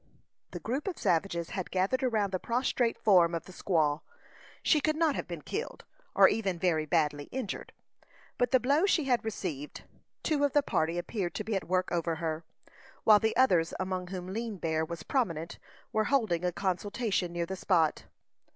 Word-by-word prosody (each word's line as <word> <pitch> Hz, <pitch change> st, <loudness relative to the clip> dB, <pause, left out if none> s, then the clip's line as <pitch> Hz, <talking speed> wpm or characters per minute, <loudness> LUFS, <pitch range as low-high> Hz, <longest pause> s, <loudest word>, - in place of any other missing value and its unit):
The -, -, -6 dB
group 270 Hz, -, -3 dB
of 370 Hz, -, -3 dB
savages 170 Hz, -1 st, 0 dB
had 185 Hz, -3 st, -4 dB
gathered 190 Hz, +8 st, +1 dB
around 220 Hz, -6 st, +1 dB
the 185 Hz, -, -1 dB
prostrate 240 Hz, +1 st, 0 dB
form 175 Hz, -5 st, +4 dB
of 165 Hz, -, -3 dB
the -, -, -11 dB
squaw. 155 Hz, -5 st, +1 dB, 0.6 s
She 305 Hz, -, +4 dB
could 310 Hz, +1 st, +1 dB
not 320 Hz, -2 st, +2 dB
have -, -, -4 dB
been 170 Hz, -4 st, -7 dB
killed, 455 Hz, -, -5 dB, 0.3 s
or -, -, +8 dB
even 195 Hz, -5 st, 0 dB
very 160 Hz, -3 st, +1 dB
badly 150 Hz, -2 st, +1 dB
injured, 250 Hz, -, -5 dB, 0.7 s
by 245 Hz, -, +4 dB
the 260 Hz, +1 st, +4 dB
blow 285 Hz, +9 st, +3 dB
she 335 Hz, -6 st, +3 dB
had 250 Hz, -3 st, +1 dB
received. 170 Hz, -10 st, -5 dB, 0.4 s
Two 300 Hz, -3 st, +1 dB
of 285 Hz, -2 st, +2 dB
the 290 Hz, -, +4 dB
party 165 Hz, -, 0 dB
appeared 175 Hz, 0 st, -3 dB
to -, -, -2 dB
be 220 Hz, -, -2 dB
at 195 Hz, -, -3 dB
work 185 Hz, +1 st, 0 dB
over 170 Hz, -1 st, 0 dB
her, 160 Hz, 0 st, -3 dB, 0.6 s
while 210 Hz, -1 st, +7 dB
the 220 Hz, 0 st, 0 dB
others, 180 Hz, -11 st, +3 dB
among 185 Hz, -1 st, -2 dB
whom 185 Hz, 0 st, -6 dB
Lean 225 Hz, -1 st, -3 dB
Bear 160 Hz, -2 st, 0 dB
was 170 Hz, +1 st, -6 dB
prominent, 170 Hz, -, -1 dB, 0.3 s
were 215 Hz, 0 st, +2 dB
holding 215 Hz, -11 st, +1 dB
a 180 Hz, -, +1 dB
consultation 195 Hz, +1 st, -1 dB
near 170 Hz, 0 st, -2 dB
the 190 Hz, -, -5 dB
spot. 170 Hz, -4 st, +1 dB
185 Hz, 185 wpm, -30 LUFS, 170-240 Hz, 0.7 s, or